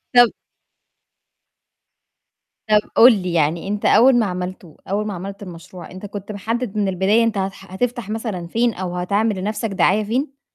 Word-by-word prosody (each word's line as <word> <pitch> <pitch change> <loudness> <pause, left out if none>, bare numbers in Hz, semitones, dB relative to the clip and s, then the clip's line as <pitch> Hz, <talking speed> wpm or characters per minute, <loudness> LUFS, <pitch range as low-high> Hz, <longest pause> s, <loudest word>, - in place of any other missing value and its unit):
طَب 245 -2 +7 2.4
طَب 210 -1 +6 0.2
قُل 245 +2 +9
لي، 180 -1 -3
يعني 165 +2 0
أنت 205 +1 -3
أول 255 +2 +6
ما 225 - +2
عملتُه، 180 -3 -6
أول 210 +2 -1
ما 205 - -3
عملت 195 +3 -7
المشروع، 175 0 -11
أنت 185 +3 -9
كنت 205 0 -7
محدِّد 215 +1 -3
من 205 - +1
البداية 190 +5 +2
أنت 230 -2 0
هتح 195 -1 -5
هتفتح 240 +2 -2
مثلًا 215 -6 -4
فين 230 +5 +1
أو 180 -2 -5
هتعمِل 200 +4 0
لنَفْسك 210 +3 -2
دعاية 195 +2 +2
فين؟ 270 +6 -3
200 Hz, 160 wpm, -20 LUFS, 185-225 Hz, 2.4 s, قُل